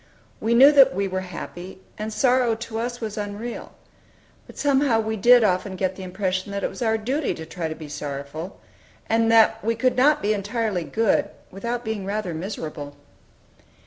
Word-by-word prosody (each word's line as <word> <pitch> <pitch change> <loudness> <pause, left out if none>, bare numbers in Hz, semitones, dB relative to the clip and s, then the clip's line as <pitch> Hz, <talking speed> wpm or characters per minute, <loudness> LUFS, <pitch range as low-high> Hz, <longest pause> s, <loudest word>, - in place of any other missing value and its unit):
We 230 +2 +1
knew 270 +4 +8
that 275 -9 +6
we 195 +1 0
were 185 0 -2
happy, 180 0 -8 0.2
and 215 +1 -5
sorrow 245 0 +2
to 225 0 -6
us 240 +1 -3
was 215 -1 -4
unreal. 205 +3 -6 0.7
But - - -14
somehow 275 -5 +2
we 220 0 -2
did 240 +3 +6
often 190 -1 0
get 185 0 -1
the 190 - -9
impression 185 +1 -3
that 200 -1 -4
it - - -1
was - - -10
our 225 -1 +2
duty 260 +7 -1
to 160 - -8
try 165 0 -4
to 160 - -5
be 155 -1 -9
sorrowful; 145 +4 -6 0.5
and 225 0 +2
that 225 0 +4
we 230 +2 0
could 250 +3 +1
not 295 +4 +3
be 210 +1 +2
entirely 205 -3 -2
good, 225 +3 +1 0.2
without 235 +5 -4
being 220 -3 -3
rather 200 -2 -3
miserable. 155 -5 -6
215 Hz, 180 wpm, -23 LUFS, 185-235 Hz, 0.7 s, knew